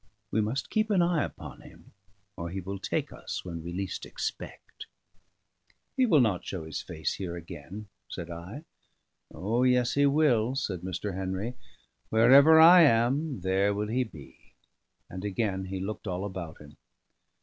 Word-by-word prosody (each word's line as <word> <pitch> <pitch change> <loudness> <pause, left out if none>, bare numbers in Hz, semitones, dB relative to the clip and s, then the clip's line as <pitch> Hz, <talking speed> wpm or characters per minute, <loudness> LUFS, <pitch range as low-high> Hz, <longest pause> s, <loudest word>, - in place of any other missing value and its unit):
We 110 - +2
must 110 +6 -3
keep 215 0 +1
an 190 -4 +3
eye 170 -3 +1
upon - - -8
him, - - -16 0.4
or 85 0 -5
he 95 +3 -4
will 95 +1 -6
take - - -3
us - - -6
when 85 -2 -6
we 85 - -6
least 95 +1 -4
expect." - - -7 1.1
"He 260 -2 +3
will 155 - +5
not 105 -7 +1
show 85 -5 -6
face 80 -1 -3
here 90 -3 -5
again," 85 +5 -9 0.2
said 85 0 -7
I. 90 - -8 0.7
"O 105 +9 -1
yes, 125 -1 +3
he 140 0 +4
will," 135 -5 +2
said 95 -10 -3
Mr. 95 +2 -4
Henry. 95 +5 -3 0.6
"Wherever 140 +8 +7
I 170 +2 +9
am, 135 - +2
there 95 +2 +1
will 105 +1 -2
he 125 +3 +1
be." 80 - -14 0.5
And 90 +1 -8
again 100 -2 -2
he 95 0 -5
looked 105 +3 -5
all 90 +1 -3
about 90 -5 -6
him. 75 0 -15
105 Hz, 160 wpm, -28 LUFS, 90-130 Hz, 1.1 s, I